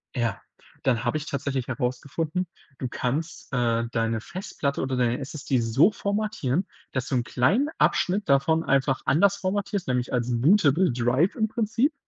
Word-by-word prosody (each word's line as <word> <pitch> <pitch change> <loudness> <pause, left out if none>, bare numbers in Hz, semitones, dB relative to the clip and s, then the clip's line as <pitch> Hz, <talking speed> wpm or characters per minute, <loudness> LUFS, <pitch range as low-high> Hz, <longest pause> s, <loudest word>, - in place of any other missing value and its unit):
Ja, 120 -2 -1 0.4
dann 125 -3 +1
habe 120 +6 +1
ich 155 - -5
tatsächlich 135 -2 -2
herausgefunden, 140 +7 -2 0.3
du 130 - -2
kannst, 155 +8 -3
äh, 115 -2 +1
deine 115 -1 0
Festplatte 145 - -4
oder 130 -1 -1
deine 120 -1 +1
SSD 135 -1 -2
so 120 - +4
formatieren, 200 - -1 0.2
dass 130 0 -2
du 135 - -1
'n 120 - +1
kleinen 195 - +2
Abschnitt 195 +1 +2
davon 140 +4 +3
einfach 135 -2 +1
anders 200 +7 +4
formatierst, 200 0 -2
nämlich 125 -1 -1
als 125 0 0
bootable 170 - +4
Drive 125 +8 +1
im 220 -2 +1
Prinzip. 230 +6 0
140 Hz, 155 wpm, -25 LUFS, 125-185 Hz, 0.4 s, so